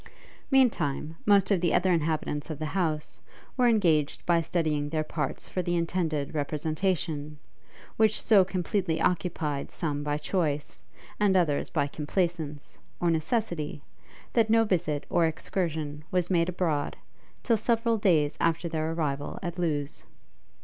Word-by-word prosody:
Meantime, 165 - +2
most 200 -1 +5
of 190 -4 +3
the 175 - +2
other 185 +1 +3
inhabitants 155 -2 -1
of 155 - -4
the 155 - -4
house, 155 -2 -1 0.4
were 250 -2 +3
engaged 165 -10 +2
by 170 -1 +3
studying 155 -3 -1
their 155 0 0
parts 150 -2 -4
for 185 - -2
the 175 0 -1
intended 165 -4 -1
representation, 155 0 -2 0.6
which 220 -1 +4
so 205 -4 +5
completely 185 -2 -1
occupied 160 -5 -1
some 145 -4 -3
by 145 0 -1
choice, 150 -3 -2 0.4
and 200 -2 +4
others 155 -5 +1
by 145 -3 +1
complaisance, 155 0 -3 0.2
or 175 -1 +2
necessity, 160 -3 -1 0.5
that 225 -2 +3
no 225 0 +5
visit 165 -8 0
or 170 -1 +3
excursion 155 -3 -3
was 180 0 0
made 170 -1 +3
abroad, 170 -5 -1 0.5
till 235 - +3
several 230 +1 +1
days 155 -7 +2
after 165 +1 +1
their 160 -1 -2
arrival 145 -3 -2
at 175 0 -4
Lewes. 150 -4 -1
165 Hz, 140 wpm, -28 LUFS, 150-185 Hz, 0.6 s, most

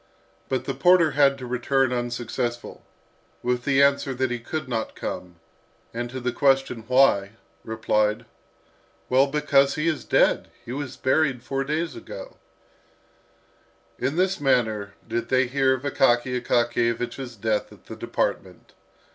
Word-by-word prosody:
But 130 -1 -1
the - - -2
porter 175 -3 +4
had 140 -1 +3
to 130 - -8
return 125 +1 +1
unsuccessful, 120 0 -3 0.6
with 125 0 -1
the 140 -1 +4
answer 140 -1 +2
that 130 0 -1
he 120 - -2
could 155 +6 -5
not 115 -3 -3
come; 90 -1 -6 0.6
and 120 +1 -4
to 130 +2 -6
the 125 0 -1
question, 135 -4 +1
"Why?" 125 -6 +3 0.3
replied, 110 -1 0 0.8
"Well, 130 +2 +4
because 140 -1 +2
he 155 +2 -1
is 160 -3 -1
dead! - - +2 0.2
he - - -7
was 135 -1 -5
buried 130 -2 +1
four 135 +1 -2
days 155 +3 -2
ago." - - -9 1.6
In 140 - -1
this 190 +1 +1
manner 110 -7 +1
did 115 +1 -3
they 130 0 +3
hear 130 +1 +2
of 130 - -9
Akaky 125 -2 +2
Akakiyevich's 120 +1 -1
death 110 0 -1
at - - -17
the - - -8
department. - - -3
130 Hz, 140 wpm, -24 LUFS, 120-140 Hz, 1.6 s, porter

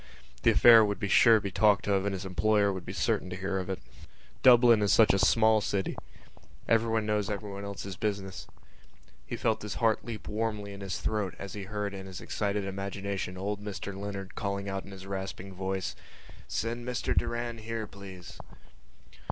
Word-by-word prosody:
The - - +4
affair 115 -2 +8
would 100 -1 -1
be 100 - -1
sure 115 +4 +6
to 110 - +2
be 100 - -4
talked 105 +2 +3
of 100 -1 +2
and 100 - -1
his 95 0 -5
employer 100 +3 +2
would 95 -2 -7
be - - -4
certain 90 - 0
to 90 - -5
hear 95 +1 -2
of 95 0 -5
it. 95 - -2 0.6
Dublin 120 -3 +7
is 100 - +2
such 110 - +6
a 100 - +2
small 110 +1 +4
city: 100 -2 -1 0.7
everyone 115 -1 +2
knows 105 -1 0
everyone 100 -1 -5
else's 100 -1 -6
business. 100 -3 -3 0.8
He - - -4
felt 110 -2 0
his 105 - -5
heart 115 -2 +2
leap 115 -3 -7
warmly 105 -2 -3
in 100 - -9
his 95 -2 -3
throat 105 -4 -2
as 100 -2 -7
he 100 -2 -6
heard 105 0 -3
in 95 -1 -7
his 95 -1 -7
excited 100 -1 -2
imagination 100 -1 -4
old 100 +2 -3
Mr 100 -1 -5
Leonard 100 -1 -6
calling 100 -1 -3
out 95 0 -4
in 100 - -11
his 95 -1 -10
rasping 95 0 -5
voice: 95 0 -3 0.5
"Send 115 +1 -3
Mr 125 0 -2
Doran 120 0 -1
here, 110 0 -4
please." 95 -3 -11
100 Hz, 185 wpm, -29 LUFS, 95-110 Hz, 0.8 s, affair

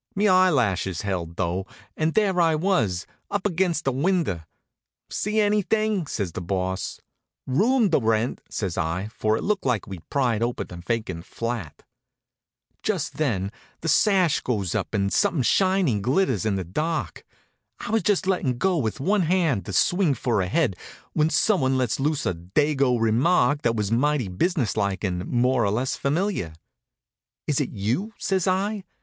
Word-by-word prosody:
Me 205 +2 +2
eyelashes 125 - +2
held 90 -4 -3
though, 90 +1 -2 0.3
and 155 0 0
there 195 -4 +3
I 165 -2 +3
was, 125 - 0 0.2
up 200 -1 -2
against 175 -4 0
a 135 - +2
window. 145 - 0 0.7
"See 210 +2 -1
anything?" 210 -2 +1
says 100 -10 -3
the 90 - -5
Boss. 95 +1 -3 0.5
"Room 215 - +2
to 160 - +4
rent," 115 0 0
says 95 -4 -3
I, 85 +5 -2
for 110 0 +1
it - - -5
looked 205 -1 0
like 125 -5 0
we'd 95 -5 -10
pried 120 -6 +1
open 120 +1 -1
a 90 - -7
vacant 90 -3 -3
flat. 115 -10 -5 1.0
Just - - -2
then 105 -11 0 0.3
the 165 - -4
sash 185 -1 +3
goes 100 -8 -1
up - - -2
and 100 -1 0
something 145 -7 +2
shiny 185 - +2
glitters 125 - +1
in 105 - +1
the 95 - -2
dark. 155 - -3 0.6
I - - -5
was 225 0 +2
just 205 -3 +1
lettin' 170 -10 0
go 185 +6 +1
with 110 0 -2
one 195 +8 +2
hand 165 - +1
to - - -4
swing 175 - +3
for 115 -6 0
a 90 - -1
head 125 - +1 0.4
when 155 0 +2
someone 135 - +2
lets 125 -2 0
loose 145 +1 0
a 95 - +1
Dago 125 - +1
remark 125 +5 +3
that 115 -1 +1
was 105 -1 -1
mighty 130 -2 +1
business 125 - 0
like 100 -2 -1
and 90 -2 -2
more 125 0 +2
or 100 - +2
less 120 +6 -1
familiar. 150 - -1 0.9
"Is 145 -1 +1
it 140 - -2
you?" 120 - -2
says 190 -2 0
I. 195 +2 0
130 Hz, 165 wpm, -24 LUFS, -, 1.0 s, to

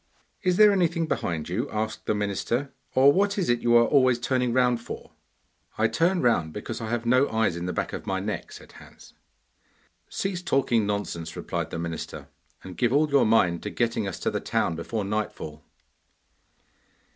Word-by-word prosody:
'Is 180 -2 +1
there 210 -1 +8
anything 170 -3 +1
behind 85 - -2
you?' 110 +11 -2
asked 110 0 -4
the 105 - +1
minister. 105 +7 -2 0.2
'Or 135 +2 +6
what 200 +3 +1
is 185 -8 0
it 120 - +1
you 120 0 +3
are 115 0 +7
always 130 -3 +4
turning 125 0 0
round 125 -1 +2
for?' - - -8 0.7
'I 110 0 +2
turn 170 +10 +1
round 85 -10 +2
because 110 +3 -6
I 110 - -4
have 120 0 -2
no 130 +4 +3
eyes 110 -5 +1
in 85 +1 -4
the - - -1
back - - -3
of - - -6
my - - 0
neck,' - - -4
said - - -12
Hans. - - -16 1.0
'Cease 190 -2 -3
talking 130 - +1
nonsense,' 85 -5 -3
replied - - -3
the - - -5
minister, 85 -1 -6 0.3
'and 95 -1 -10
give 120 -2 +2
all 150 +2 +2
your 140 -5 +4
mind 90 -6 +3
to - - -4
getting 115 -3 -1
us 95 - -5
to - - 0
the - - -2
town 85 - -1
before 105 +6 -3
nightfall. 95 -7 -4
115 Hz, 185 wpm, -26 LUFS, 100-140 Hz, 1.0 s, there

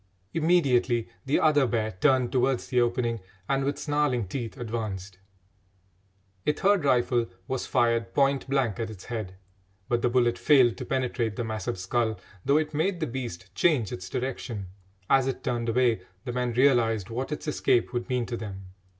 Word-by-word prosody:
Immediately 135 -8 +2 0.2
the 140 - +3
other 145 -4 +4
bear 110 -1 0
turned 130 +5 +2
towards 130 0 +1
the 125 -1 +2
opening 120 -1 0 0.3
and, 135 0 +1
with 140 +1 -1
snarling 145 -7 0
teeth, 120 +4 -5
advanced. 105 -6 -5 1.3
A 150 - +4
third 195 +2 +2
rifle 120 -2 +2 0.2
was 130 -1 -2
fired 115 -1 +1
point 140 -1 +2
blank 130 -5 +1
at 115 -1 -2
its 100 -4 -10
head, 110 -6 -5 0.5
but 120 -1 +1
the 120 - +2
bullet 120 -1 +2
failed 130 -6 +5
to - - -5
penetrate 125 -4 -1
the 120 - -2
massive 110 -4 -3
skull, 110 +4 -1 0.2
though 140 - +3
it 155 0 -1
made 170 +4 0
the 160 - 0
beast 115 - -6
change 120 - +2
its 90 +1 -6
direction. 120 -6 -4 0.4
As 135 -1 +4
it 135 - -3
turned 120 -3 -1
away 115 -3 +2 0.2
the 125 - -3
men 125 -1 -1
realised 115 -5 +3
what 130 +5 -3
its 150 - -5
escape 125 -5 +1
would 120 +2 -3
mean 125 -2 0
to 120 - -4
them. 95 -4 -7
120 Hz, 170 wpm, -27 LUFS, 115-135 Hz, 1.3 s, failed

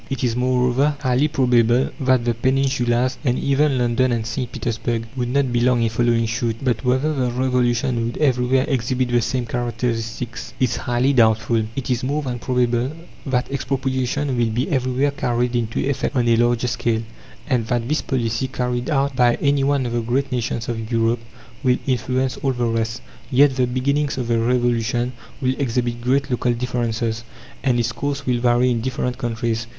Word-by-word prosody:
It 135 -3 -3
is, 120 -2 +1
moreover, 125 +3 +2
highly 130 +1 +2
probable 125 -3 +2
that 130 -3 +2
the 120 - +2
Peninsulas 130 0 +1
and 125 -3 +1
even 140 0 +2
London 125 +1 +2
and 115 -2 -1
St. 120 +2 -3
Petersburg 115 -1 -2
would 125 -2 -2
not 135 -1 +1
be 120 - +2
long 120 -1 +3
in 115 - +2
following 115 0 +1
suit. 115 0 -1
But 125 -3 0
whether 130 +5 +1
the 130 -4 0
Revolution 120 -1 +1
would 120 - -5
everywhere 130 -2 +2
exhibit 130 -2 0
the 120 0 +2
same 125 +1 -1
characteristics 115 0 -3
is 125 -3 +1
highly 125 +3 +1
doubtful. 110 -2 +3
It 135 -1 -3
is 125 0 0
more 145 +3 -1
than 125 -2 -3
probable 125 0 0 0.4
that 130 0 0
expropriation 135 0 -1
will 115 -1 +2
be 120 +4 -1
everywhere 130 +1 +1
carried 125 -2 -1
into 115 -2 -1
effect 140 +1 -1
on 120 -2 +2
a 115 - +5
larger 120 +1 +2
scale, 115 -2 0 0.4
and 125 -5 0
that 120 -1 -1
this 150 +3 0
policy 120 -1 -1
carried 125 0 -2
out 140 -2 +1
by 120 -1 +4
any 140 -1 +1
one 140 -1 +1
of 120 - -3
the 120 0 0
great 135 +4 -1
nations 120 -2 -2
of 115 -1 -4
Europe 115 0 +2 0.4
will 125 -2 +3
influence 130 0 0
all 135 -1 0
the 120 -1 -1
rest; 115 - -1 0.3
yet 135 +1 +4
the 130 -1 +2
beginnings 140 +3 0
of 125 -2 -3
the 115 -1 +2
Revolution 120 0 +1 0.3
will 130 0 +2
exhibit 120 -2 -1
great 130 +3 +1
local 125 0 +1
differences, 115 -2 -2 0.4
and 125 -3 +2
its 120 +1 0
course 140 +2 -3
will 125 -1 +1
vary 120 +1 +3
in 115 -2 0
different 125 0 -2
countries. 115 -2 -2
125 Hz, 180 wpm, -21 LUFS, 120-130 Hz, 0.4 s, a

